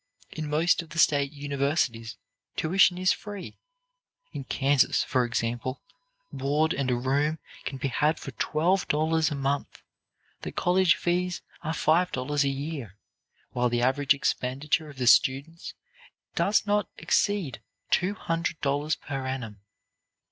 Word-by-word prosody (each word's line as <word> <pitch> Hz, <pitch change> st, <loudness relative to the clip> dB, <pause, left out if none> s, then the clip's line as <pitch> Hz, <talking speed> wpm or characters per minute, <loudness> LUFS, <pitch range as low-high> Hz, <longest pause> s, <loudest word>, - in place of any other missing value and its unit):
In 155 Hz, -2 st, -5 dB
most 160 Hz, +4 st, +2 dB
of 165 Hz, -, -13 dB
the 170 Hz, -, -9 dB
state 140 Hz, -4 st, +3 dB
universities 140 Hz, -6 st, -1 dB, 0.4 s
tuition 180 Hz, +2 st, +3 dB
is 185 Hz, 0 st, +3 dB
free. 205 Hz, -2 st, -8 dB, 0.7 s
In 140 Hz, -, -5 dB
Kansas, 140 Hz, 0 st, +2 dB
for 125 Hz, -2 st, +1 dB
example, 120 Hz, +2 st, -3 dB, 0.5 s
board 145 Hz, +4 st, +1 dB
and 135 Hz, -1 st, -1 dB
a 125 Hz, -, +2 dB
room 140 Hz, +5 st, 0 dB, 0.3 s
can 135 Hz, -, -4 dB
be 135 Hz, +1 st, -2 dB
had 150 Hz, +5 st, +1 dB
for -, -, -7 dB
twelve 175 Hz, +5 st, 0 dB
dollars 160 Hz, +1 st, +2 dB
a 150 Hz, -, -3 dB
month; 140 Hz, +1 st, -2 dB, 0.6 s
the -, -, -5 dB
college 180 Hz, -1 st, +3 dB
fees 180 Hz, 0 st, -1 dB, 0.2 s
are 160 Hz, -, -3 dB
five 175 Hz, +4 st, +2 dB
dollars 140 Hz, +3 st, 0 dB
a 140 Hz, -, +1 dB
year, 135 Hz, -, -5 dB, 0.5 s
while 125 Hz, 0 st, +1 dB
the 120 Hz, 0 st, 0 dB
average 140 Hz, +2 st, +3 dB
expenditure 140 Hz, +4 st, -1 dB
of 140 Hz, -, -13 dB
the 125 Hz, -, -1 dB
students 135 Hz, -, +2 dB, 0.6 s
does 210 Hz, +2 st, +2 dB
not 205 Hz, 0 st, +1 dB
exceed 175 Hz, -, 0 dB, 0.3 s
two 185 Hz, +3 st, +2 dB
hundred 165 Hz, -2 st, -2 dB
dollars 145 Hz, +2 st, 0 dB
per 135 Hz, -2 st, -5 dB
annum. 115 Hz, -6 st, -5 dB
145 Hz, 140 wpm, -27 LUFS, 130-165 Hz, 0.7 s, state